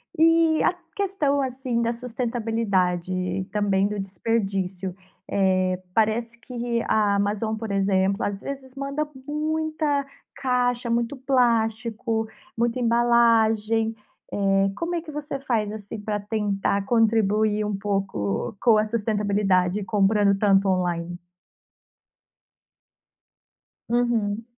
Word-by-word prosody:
E 330 0 +4
a - - +3 0.2
questão, 340 -9 0
assim, 255 -2 -2
da 235 - +1
sustentabilidade 225 -7 -1
e 185 +1 -2
também 200 -1 +1
do 210 0 -4
desperdício, 195 -2 -2 0.3
eh, 185 -2 +1
parece 230 +2 +1
que 240 -1 -3
a 210 -2 +3
Amazon, 205 +2 0
por 220 -1 -5
exemplo, 195 0 +1
às 200 -1 -2
vezes 265 +1 -7
manda 280 +2 -2 0.2
muita 305 -1 -1 0.3
caixa, 245 -2 0
muito 235 +3 0
plástico, 230 -3 +1 0.3
muita 235 +1 0
embalagem, 230 -2 +3 0.4
eh, 195 -1 +2
como 340 +5 -2
é 335 - -1
que 320 -1 -9
você 295 -2 -5
faz, 225 -6 -1
assim, 215 0 -7
pra 210 0 -2
tentar 200 -1 -1
contribuir 215 -2 +2
um 210 -1 -2
pouco 195 - -2
com 230 -3 +5
a 215 - +2
sustentabilidade, 205 -3 +1
comprando 200 0 +3
tanto 195 -1 +4
online? 175 -2 -1 2.7
Uhum. 230 -3 0
220 Hz, 110 wpm, -24 LUFS, 200-240 Hz, 2.7 s, com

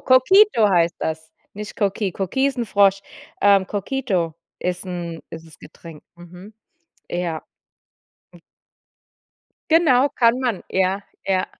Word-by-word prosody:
Coquito 260 - +5
heißt 170 -1 +2
das, 160 0 -5 0.2
nicht 210 +1 -8
Coqui. 200 -1 -1
Coqui 200 +8 -1
ist 270 - -6
’n 240 - 0
Frosch, 195 -1 +3 0.4
ähm, 200 -1 +5
Coquito 200 - -2 0.2
ist 180 +1 -4
’n 170 -2 -6
ist 165 0 -9
das 160 - -17
Getränk. 160 -1 -13
Mhm, 180 +4 -13 0.6
ja. 175 -3 -3 2.3
Genau, 290 -5 +4
kann 245 -2 +2
man. 240 -7 -2
Ja, 190 +1 0 0.2
ja. 190 -1 0
195 Hz, 120 wpm, -21 LUFS, 175-235 Hz, 2.3 s, Coquito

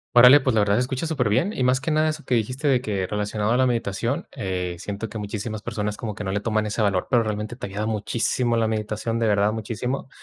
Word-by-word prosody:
Órale, 125 +4 +9
pues 130 -2 +1
la - - +4
verdad 100 0 +3
se 120 - +2
escucha 130 +5 -2
superbién, 145 - +1
y 130 - -1
más 130 +1 +3
que 145 - -3
nada 155 0 +2
eso 155 0 -5
que 125 - +1
dijiste 125 +6 -1
de 130 -3 +3
que 100 -5 -2
relacionado 105 +1 -1
a 120 - +3
la 130 - +4
meditación, 120 +1 -1
eh, 90 -2 -3
siento 100 +4 -5
que 110 - -7
muchísimas 105 +1 -4
personas 105 -2 -3
como 110 -2 -5
que 105 - -6
no 95 - -2
le 100 - -1
toman 110 0 0
ese 110 +1 -2
valor, 100 -3 +1
pero 120 -2 +4
realmente 105 +1 -3
te 125 - -6
ayuda 105 +2 -3
muchísimo 115 +2 0
la 110 -1 +2
meditación, 110 +1 -2
de 115 - +1
verdad 105 0 +2
muchísimo. 115 +5 -4
110 Hz, 245 wpm, -24 LUFS, 105-125 Hz, -, Órale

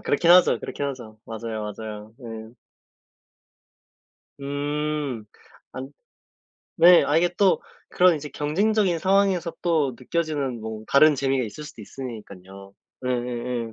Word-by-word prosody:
그렇긴 165 +4 +2
하죠, 180 0 +6
그렇긴 145 - -4
하죠. 120 -6 -7
맞아요, 110 -1 -5
맞아요. 110 0 -9
예. 115 -1 -8 1.9
음. 145 -3 -3 0.5
아 130 - -6 1.0
네. 175 +1 +7
아 145 +2 +1
이게 175 +1 +3
또 195 -2 +4 0.3
그런 180 -2 +4
이제 150 0 -7
경쟁적인 185 +5 +1
상황에서 190 -2 +2
또 155 -7 +1
느껴지는 140 -4 -2
뭐 110 0 -7
다른 150 +2 +6
재미가 135 -1 0
있을 115 +8 -8
수도 130 -7 -11
있으니깐요. 100 -6 -10 0.3
예예예. 120 -1 -3
135 Hz, 260 characters per minute, -24 LUFS, 115-160 Hz, 1.9 s, 네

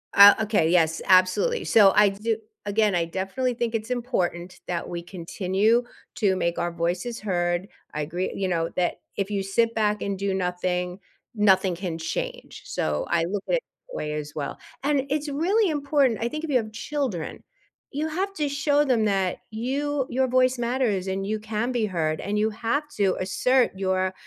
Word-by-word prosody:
Uh, 200 0 +11
okay, 210 -7 +2
yes, 165 -2 +3
absolutely, 185 - +4
so, 205 -3 +6
I 210 -1 +6
do 215 +3 -2 0.3
again, 205 -1 +2
I 170 - +2
definitely 195 +9 -2
think 230 -1 -1
it's 220 +1 -3
important 185 -8 -2
that 175 -1 -2
we 175 -1 -4
continue 190 +6 0 0.3
to 195 -4 +2
make 170 -1 -1
our 175 0 -1
voices 175 +7 -2
heard. 175 -2 -1 0.3
I 150 - -2
agree, 175 +5 -3
you 195 - -2
know, 165 -2 0
that 180 -1 0 0.2
if 195 0 -1
you 200 -2 -1
sit 230 +4 +1
back 210 -1 +1
and 200 -1 -2
do 195 0 -1
nothing, 180 0 -2 0.4
nothing 190 -3 +3
can 175 -2 -4
change. 165 0 -5
So, 75 -1 -1
I 170 -1 +2
look 195 +3 -3
at - - +3
it - - -1 0.3
that - - -9
way 150 0 -3
as 150 -1 -5
well, 145 - -4 0.3
and 285 -1 +2
it's 295 +1 -1
really 365 +9 +2
important 280 -5 +1
I 235 - +1
think 305 +5 -5
if 325 - -4
you 270 - +4
have 220 -3 -3
children, 245 - -3 0.5
you 300 +3 -2
have 375 +5 -2
to 300 -5 -1
show 285 +1 +2
them 240 -5 +2
that 195 -3 0
you 270 +5 -1
your 260 +1 +1
voice 255 0 +3
matters, 235 -6 0
and 190 +1 -2
you 215 +2 -2
can 220 +3 -2
be 240 -3 +1
heard, 160 -5 -1
and 205 +2 -2
you 215 +1 +2
have 230 +7 -1
to 195 -3 +2
assert 245 +7 +2
your 185 -1 0
205 Hz, 190 wpm, -25 LUFS, 180-250 Hz, 0.5 s, Uh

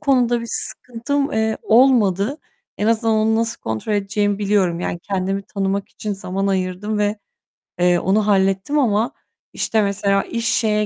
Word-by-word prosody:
konuda 245 -4 +2
bir 230 - -7
sıkıntım, 275 +4 0
eee, 220 0 0
olmadı. 230 - +3 0.4
En 210 - 0
azından 225 0 +2
onu 220 +1 +2
nasıl 230 0 -1
kontrol 110 - -3
edeceğimi 205 0 0
biliyorum. 195 -4 +1
Yani, 175 - -3
kendimi 195 0 -2
tanımak 195 0 -3
için 210 - -5
zaman 195 0 -3
ayırdım 190 +2 -2
ve, 210 +1 0 0.6
eee, 175 0 +3
onu 205 +3 +1
hallettim 195 +7 +2
ama, 230 -1 +1 0.4
işte, 220 - 0
mesela 200 -1 +1
iş 230 0 -3
şeye 210 -2 +1
210 Hz, 150 wpm, -20 LUFS, 195-225 Hz, 0.6 s, olmadı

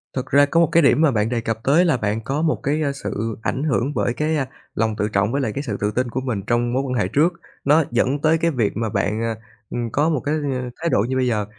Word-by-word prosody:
Thực 130 -1 -2
ra 140 +2 +4
có 165 +4 +1
một 170 - +4
cái 170 - +4
điểm 140 +2 +4
mà 155 -4 +4
bạn 110 0 0
đề 120 -2 -1
cập 115 0 -2
tới 160 +7 +4
là 160 -6 +2
bạn 110 0 -1
có 140 +6 -2
một 160 -1 +2
cái, 150 +3 0
à, 140 - +1
sự 115 -5 -4
ảnh 135 +4 -2
hưởng 140 -2 0
bởi 120 - 0
cái, 155 +3 0
à, 135 - -1 0.3
lòng 110 0 0
tự 105 -1 -1
trọng 100 +3 +2
với 140 - 0
lại 115 - -1
cái 140 - -3
sự 110 -8 -3
tự 105 - +1
tin 125 +3 -1
của 130 +3 -3
mình 115 -7 -2
trong 120 0 +1
mối 135 - +1
quan 130 -2 -3
hệ 125 - +1
trước, 165 +5 +2 0.3
nó 150 +3 +5
dẫn 130 +4 +1
tới 160 +1 +3
cái 165 +1 +1
việc 120 -8 0
mà 110 -1 -1
bạn, 100 +2 -1
à, 115 -1 -1 0.3
ừm, 120 -1 -3
có 150 +7 +2
một 155 -4 +1
cái, 150 +2 +1 0.2
à, 125 -1 -3
thái 170 - 0
độ - - +2
như 130 - -1
bây 130 - +1
giờ. 105 -4 0
130 Hz, 295 wpm, -21 LUFS, 115-150 Hz, 0.3 s, nó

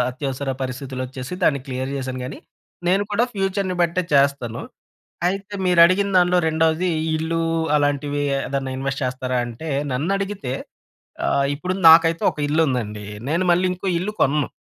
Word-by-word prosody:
అత్యవసర 135 +1 -4
పరిస్థితులొచ్చేసి 130 +2 -5
దాన్ని 140 -5 +3
క్లియర్ 130 +1 -4
జేశాను 130 -1 -4
కానీ, 130 - -7 0.5
నేను 190 +3 +3
కూడా 230 +4 +3
ఫ్యూచర్‌ని 195 -1 -1
బట్టే 170 +2 +1
చేస్తాను. 140 -4 +1 0.7
అయితే 195 +2 -4
మీరడిగిన 180 +2 +5
దానిలో 180 0 +3
రెండవది 160 +2 +1 0.3
ఇల్లు 165 +1 -1 0.4
అలాంటివి 145 0 0 0.2
ఏదైనా 135 -1 -3
ఇన్వెస్ట్ 135 +1 -3
చేస్తారా 130 0 -2
అంటే, 120 +7 -7 0.2
నన్నడిగితే 190 0 -2 0.8
ఆహ్, 140 - +2
ఇప్పుడు 180 +5 -3 0.2
నాకైతే 165 0 +6
ఒక - - -20
ఇల్లుందండి. 125 -9 0 0.2
నేను 170 +4 +1
మళ్ళీ 180 +2 +3
ఇంకో 185 +2 -6
ఇల్లు 185 +5 -2
కొనను. 145 +1 +2
150 Hz, 130 wpm, -22 LUFS, 130-180 Hz, 0.8 s, నాకైతే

